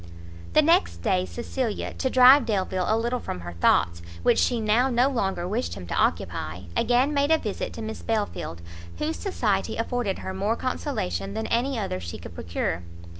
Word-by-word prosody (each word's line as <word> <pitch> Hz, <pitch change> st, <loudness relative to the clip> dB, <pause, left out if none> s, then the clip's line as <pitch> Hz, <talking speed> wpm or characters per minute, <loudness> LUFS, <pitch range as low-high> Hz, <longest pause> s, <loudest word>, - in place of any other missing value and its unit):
The 310 Hz, -, +6 dB
next 340 Hz, +5 st, +2 dB
day 185 Hz, -5 st, +1 dB
Cecilia, 240 Hz, -2 st, -3 dB
to 260 Hz, -, -1 dB
drive 255 Hz, 0 st, +7 dB
Delvile 190 Hz, -3 st, 0 dB
a 220 Hz, -, +3 dB
little 240 Hz, +2 st, -1 dB
from 90 Hz, -, -5 dB
her 85 Hz, 0 st, -7 dB
thoughts, 85 Hz, 0 st, +2 dB, 0.2 s
which -, -, +4 dB
she 245 Hz, -2 st, +2 dB
now 225 Hz, +4 st, +3 dB
no 245 Hz, +1 st, +3 dB
longer 195 Hz, -9 st, -1 dB
wished 225 Hz, +7 st, -2 dB
him 90 Hz, -3 st, -8 dB
to 85 Hz, -, -5 dB
occupy, 80 Hz, +4 st, -1 dB
again 250 Hz, +4 st, +2 dB
made 285 Hz, 0 st, +2 dB
a 320 Hz, -, +5 dB
visit 210 Hz, -9 st, -4 dB
to 225 Hz, -, -6 dB
Miss 220 Hz, 0 st, -5 dB
Belfield, 205 Hz, -, -3 dB, 0.3 s
whose 320 Hz, +1 st, -2 dB
society 390 Hz, -2 st, -1 dB
afforded 245 Hz, -6 st, -1 dB
her 190 Hz, -, -5 dB
more 200 Hz, +4 st, 0 dB
consolation 100 Hz, -, -3 dB
than 110 Hz, -, -2 dB
any 250 Hz, -, 0 dB
other 195 Hz, -, -2 dB
she 85 Hz, -1 st, -6 dB
could 85 Hz, -, -10 dB
procure. 85 Hz, 0 st, -3 dB
220 Hz, 180 wpm, -25 LUFS, 175-255 Hz, 0.3 s, drive